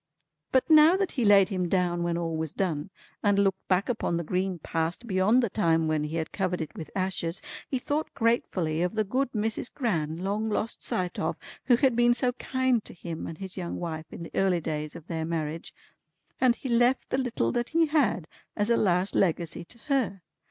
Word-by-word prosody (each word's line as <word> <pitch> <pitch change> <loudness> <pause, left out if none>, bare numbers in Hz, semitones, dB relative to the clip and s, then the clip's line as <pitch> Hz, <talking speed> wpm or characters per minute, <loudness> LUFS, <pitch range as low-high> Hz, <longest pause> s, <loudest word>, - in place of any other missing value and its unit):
But 260 - +3
now 315 +3 +7
that 390 -1 0
he 250 - -1
laid 200 -2 +6
him 185 -3 -1
down 175 -2 +1
when 170 0 0
all 165 -1 -2
was 160 -2 -3
done, 165 -4 -2 0.3
and 205 -1 +3
looked 195 -1 +1
back 185 +1 +2
upon 220 -8 -1
the 170 - -2
green 185 +2 -1
Past 165 +6 -2
beyond 210 +4 +3
the 235 - +1
time 165 -5 +2
when 155 -1 0
he 155 +2 -4
had 160 -1 -2
covered 185 -2 -1
it 160 -3 -5
with 160 - -7
ashes, 185 -2 -1 0.3
he 265 - 0
thought 290 +5 -2
gratefully 185 - +1
of 180 +4 -1
the 215 - +2
good 255 +5 -1
Mrs. 220 +2 -1
Gran 165 - -1
long 205 +4 -1
lost 220 +1 -2
sight 180 -1 -2
of, 160 - -1 0.3
who 250 - +6
had 255 0 +2
been 240 0 +4
so 250 0 +1
kind 260 -2 0
to - - -9
him 170 -1 -6
and 160 - -7
his 190 +1 -8
young 175 -2 -4
wife 160 -2 -5
in - - -7
the - - -9
early 190 -2 +2
days 155 -2 -4
of 160 - -10
their 165 -2 -3
marriage, 160 -1 -3 0.7
and 250 -2 +4
he 265 - -7
left 245 +2 +2
the 260 - +1
little 250 -3 0
that 240 -1 -1
he 330 0 +3
had 270 - +1 0.3
as 210 +2 0
a 235 - +4
last 185 -1 +2
Legacy 170 -3 0
to 235 - -8
her. 240 - 0
190 Hz, 210 wpm, -27 LUFS, 165-240 Hz, 0.7 s, now